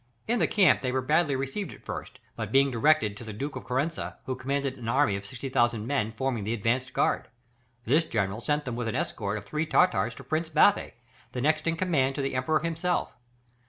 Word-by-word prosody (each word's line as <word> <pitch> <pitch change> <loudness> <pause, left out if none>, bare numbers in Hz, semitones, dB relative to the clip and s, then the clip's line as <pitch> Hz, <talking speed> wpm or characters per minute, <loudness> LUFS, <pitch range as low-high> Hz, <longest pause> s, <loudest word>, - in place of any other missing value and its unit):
In 235 +1 +1
the - - +3
camp 200 -4 +4
they 125 - -1
were 130 0 0
badly 150 +1 +2
received 135 +9 -3
at - - -14
first, - - -6 0.2
but - - -4
being 135 0 +4
directed 120 -3 +3
to - - -9
the 110 -2 -7
Duke 140 +7 -4
of - - -6
Corrensa, 140 +6 -2
who 130 - -2
commanded 135 +1 -2
an 115 -1 -4
army 125 -5 +3
of 100 0 -6
60,000 120 -3 0
men 115 -5 0
forming 120 -1 -2
the 110 +3 -1
advanced 120 +4 0
guard: - - +1 0.6
this 150 +8 +4
general 105 -4 -1
sent 150 +3 0
them 125 -3 -3
with 120 -1 -3
an 110 - -2
escort 100 -1 -2
of 100 - -8
three 150 +9 -2
Tartars 115 - +3
to - - -10
Prince 160 +1 -1
Bathy, 165 +6 +4 0.4
the 125 - -2
next 155 +3 +1
in 165 0 +1
command 145 -7 +1
to 140 - -2
the 135 - -2
Emperor 130 +5 +1
himself. 165 +2 -1
135 Hz, 215 wpm, -28 LUFS, 115-155 Hz, 0.6 s, camp